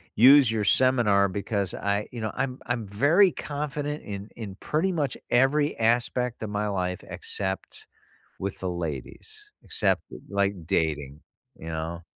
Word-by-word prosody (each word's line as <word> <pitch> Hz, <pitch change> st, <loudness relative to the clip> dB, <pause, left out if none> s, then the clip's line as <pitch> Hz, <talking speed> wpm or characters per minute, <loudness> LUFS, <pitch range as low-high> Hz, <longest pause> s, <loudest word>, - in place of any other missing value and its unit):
use 130 Hz, +1 st, +8 dB
your 110 Hz, -2 st, 0 dB
seminar 105 Hz, -4 st, +4 dB
because 100 Hz, 0 st, -2 dB
I 100 Hz, +1 st, -1 dB
you 120 Hz, -, -7 dB
know, 110 Hz, -1 st, -2 dB
I'm 130 Hz, 0 st, -2 dB
I'm 120 Hz, -4 st, -2 dB
very 155 Hz, -, +4 dB
confident 150 Hz, 0 st, -4 dB
in 100 Hz, 0 st, -6 dB
in 105 Hz, -5 st, -7 dB
pretty 165 Hz, +5 st, 0 dB
much 150 Hz, -7 st, -1 dB
every 145 Hz, +4 st, +3 dB
aspect 120 Hz, +1 st, +1 dB
of 110 Hz, -, -3 dB
my 105 Hz, +1 st, -1 dB
life 90 Hz, -2 st, -2 dB
except 95 Hz, -1 st, -4 dB, 0.5 s
with 100 Hz, 0 st, -4 dB
the 95 Hz, -, -2 dB
ladies. 80 Hz, -7 st, -5 dB, 0.2 s
Except -, -, +1 dB, 0.3 s
like, 100 Hz, -4 st, -1 dB
dating, 75 Hz, -3 st, -1 dB, 0.4 s
you 80 Hz, -, -8 dB
know? 80 Hz, +1 st, -4 dB
105 Hz, 145 wpm, -26 LUFS, 95-130 Hz, 0.5 s, use